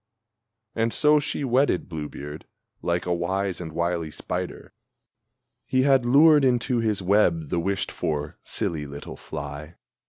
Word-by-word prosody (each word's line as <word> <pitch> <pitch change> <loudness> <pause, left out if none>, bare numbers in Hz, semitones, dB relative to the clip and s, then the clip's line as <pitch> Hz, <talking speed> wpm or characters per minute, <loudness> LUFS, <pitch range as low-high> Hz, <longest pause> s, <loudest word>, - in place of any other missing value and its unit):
And 115 0 0
so 150 +3 +5
she 145 - -2
wedded 130 -6 +2
Blue 75 -4 -5
beard 75 +2 -9 0.3
like 85 0 -1
a 90 - 0
wise 95 +2 -1
and 80 -2 -6
wily 85 0 -1
spider - - -5 0.9
He 130 0 +2
had 135 -3 +4
lured 150 +3 +6
into 125 -1 +2
his 105 -4 0
web 90 -6 +2
the - - 0
wished 95 +3 -1
for, 75 -1 -3
silly 75 -3 -3
little 70 +1 -8
fly! 75 +4 -7
95 Hz, 145 wpm, -25 LUFS, 80-125 Hz, 0.9 s, lured